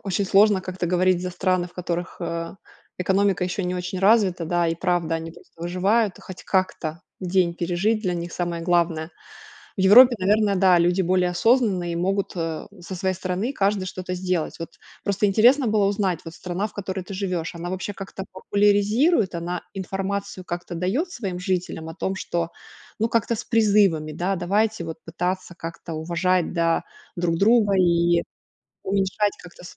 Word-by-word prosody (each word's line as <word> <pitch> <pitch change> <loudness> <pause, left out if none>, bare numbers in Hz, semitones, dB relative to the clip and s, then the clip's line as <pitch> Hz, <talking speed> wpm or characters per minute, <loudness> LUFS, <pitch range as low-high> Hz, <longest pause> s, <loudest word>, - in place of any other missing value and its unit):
Очень 195 0 -1
сложно 200 0 +4
как-то 185 -1 -4
говорить 180 +1 +2
за 180 - -3
страны, 185 0 0
в - - -23
которых, 175 0 -4
а, 165 +1 -4 0.4
экономика 190 0 +2
еще 185 +2 -2
не 180 0 -2
очень 180 +1 -4
развита, 195 -3 +3
да. 175 +1 +1
И 165 - 0
правда, 175 -1 0
они 165 0 -6
просто 165 - -18
выживают 190 +4 +1
и - - -14
хоть 185 - -10
как-то 170 -4 -1 0.2
день 180 -2 +1
пережить- 180 +6 0
для 180 -4 0
них 170 0 -5
самое 175 -1 -3
главное. 170 -2 +1 0.7
В - - 0
Европе, 240 +6 +8
наверное, 205 +2 +2
да, 185 -1 +5
люди 175 +2 +2
более 180 0 +2
осознанные 195 -3 +2
и - - -3
могут, 195 +3 0
э, 165 -2 -3
со 185 +2 -7
своей 190 +1 -1
стороны 185 +6 -2
каждый 200 -5 0
что-то 185 0 -5
сделать. 180 -3 -2
Вот 165 - -5 0.3
просто 200 +1 +1
интересно 240 +7 +4
было 215 -1 +2
узнать, 195 -4 0
вот 165 - -9
страна, 180 +4 -3
в - - -19
которой 190 -1 -4
ты 195 - -8
живешь, 185 -2 -3
она 170 +1 -5
вообще 185 +2 -4
как-то 195 0 -7
популяризирует, 205 - +2
она 170 +1 -4
информацию 195 0 -4
как-то 175 0 -5
дает 215 - -1
своим 195 - -4
жителям 180 -4 -3
о - - -7
том, 190 +1 -2
что, 170 -3 -3 0.5
ну, 225 +2 +1
как-то 230 0 +1
с - - -5
призывами, 200 -9 +2
да: 180 +5 -1
давайте 205 +2 0
вот 160 -1 -6
пытаться 180 +2 -3
как-то 165 0 -7
уважать, 170 +3 0
да, 165 -1 +1 0.3
друг 170 -1 0
друга 210 +1 +4
и 170 -1 +3 0.6
уменьшать 195 +1 0
как-то. 180 0 -14
185 Hz, 170 wpm, -23 LUFS, 175-200 Hz, 0.7 s, Европе